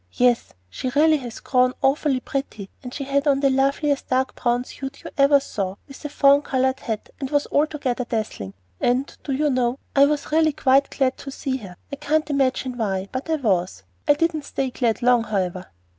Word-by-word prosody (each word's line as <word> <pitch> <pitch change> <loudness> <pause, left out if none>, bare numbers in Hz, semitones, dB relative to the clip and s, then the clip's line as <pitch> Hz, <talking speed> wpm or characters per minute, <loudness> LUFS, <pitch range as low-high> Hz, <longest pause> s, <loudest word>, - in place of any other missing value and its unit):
"Yes, 245 -1 +2
she 175 - -4
really 310 +1 +5
has 245 -5 -8
grown 255 -1 +2
awfully 270 0 +2
pretty; 270 -10 -5
and 250 - -8
she 280 - -5
had 280 +2 0
on 275 -1 +3
the 275 -1 +3
loveliest 275 +2 +1
dark 260 0 +1
brown 240 0 0
suit 270 +2 -8
you - - -8
ever 280 0 +5
saw, 195 -8 -4
with 275 +1 -13
a 295 - -4
fawn 280 0 +5
colored 265 -1 0
hat, 220 -2 -4
and 270 -2 -4
was 290 0 +1
altogether 285 -5 0
dazzling; 215 - -4 0.2
and, 255 +3 0
do 280 - -4
you 290 +2 +1
know, 250 0 +1 0.2
I 280 0 +7
was 295 0 -2
really 315 -1 +3
quite 275 0 +3
glad 265 -2 0
to 275 - -7
see 270 -1 -3
her. 190 -7 -11 0.2
I - - -3
can't 310 +1 0
imagine 260 -2 0
why, 195 -3 -2
but 260 +5 -5
I 320 - +2
was! 185 - -1 0.2
I 290 - +6
didn't 315 -1 -1
stay 265 -1 -2
glad 240 -2 -1
long, 245 -2 +4
however." 185 -3 -2
265 Hz, 200 wpm, -23 LUFS, 240-285 Hz, 0.2 s, I